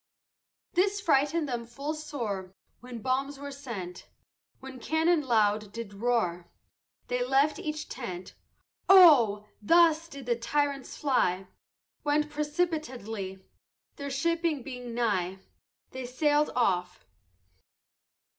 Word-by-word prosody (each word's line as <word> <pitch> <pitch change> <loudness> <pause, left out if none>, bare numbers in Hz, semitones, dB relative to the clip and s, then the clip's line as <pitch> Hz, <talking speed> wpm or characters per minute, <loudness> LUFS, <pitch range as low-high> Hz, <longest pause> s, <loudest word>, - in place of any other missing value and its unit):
This 395 +3 +2
frighted 310 -2 +2
them 240 -3 -4
full 275 +6 -4
sore 230 -12 -5 0.2
When 245 -3 -9
bombs 270 +2 -1
were 285 0 -7
sent, 220 -11 -7 0.5
When 265 -1 -10
cannon 320 +4 +2
loud 215 -5 +1
did 230 -2 -7
roar 200 -6 -1 0.6
They 245 0 0
left 275 +4 +2
each 305 0 -4
tent: 185 -8 -7 0.6
Oh! 265 - +7 0.2
thus 330 +6 +4
did 280 -5 -10
the 240 -1 +1
tyrants 280 +3 -2
fly, 195 -10 +1 0.6
Went 300 0 +1
precipitately, 290 - -3 0.5
Their 280 -1 -5
shipping 330 0 0
being 250 -3 -7
nigh, 190 -6 0 0.5
They 260 -1 -6
sailed 295 +4 +2
off. 180 -7 0
260 Hz, 110 wpm, -29 LUFS, 220-300 Hz, 0.6 s, Oh